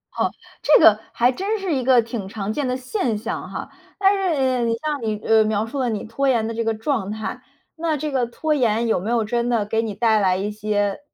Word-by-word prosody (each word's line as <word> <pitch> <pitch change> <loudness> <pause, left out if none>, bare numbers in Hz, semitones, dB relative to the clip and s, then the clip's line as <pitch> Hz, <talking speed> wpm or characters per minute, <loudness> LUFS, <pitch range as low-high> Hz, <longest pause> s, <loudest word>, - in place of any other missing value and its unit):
哦， - - 0 0.3
这 300 - +6
个 215 -1 +7
还 245 +2 +3
真 395 - -2
是 380 -4 -2
一 260 - -1
个 250 -1 +5
挺 225 -3 -5
常 210 0 -4
见 280 +2 -1
的 250 0 -1
现 255 - -2
象 225 +2 -5
哈。 - - -6 0.3
但 390 0 +5
是 275 -10 +1
你 230 0 +1
像 295 +3 -3
你， 215 -1 -1
呃， 220 -1 +5
描 215 0 0
述 265 +5 -5
了 255 -2 +1
你 215 -3 -3
拖 250 +5 -2
延 235 -4 +2
的 230 - -3
这 230 +1 -2
个 225 0 0
状 220 -2 -2
态， 220 +4 -5 0.3
那 320 -1 -1
这 300 +1 -3
个 260 -3 +1
拖 305 +6 -1
延 235 -4 +1
有 220 - +2
没 200 +5 -4
有 235 -1 +2
真 235 +2 -1
的 230 -4 +1
给 225 +2 0
你 215 -3 -4
带 225 -2 +3
来 185 -2 +2
一 200 +2 -2
些 205 -1 -1
230 Hz, 260 characters per minute, -22 LUFS, 215-270 Hz, 0.3 s, 个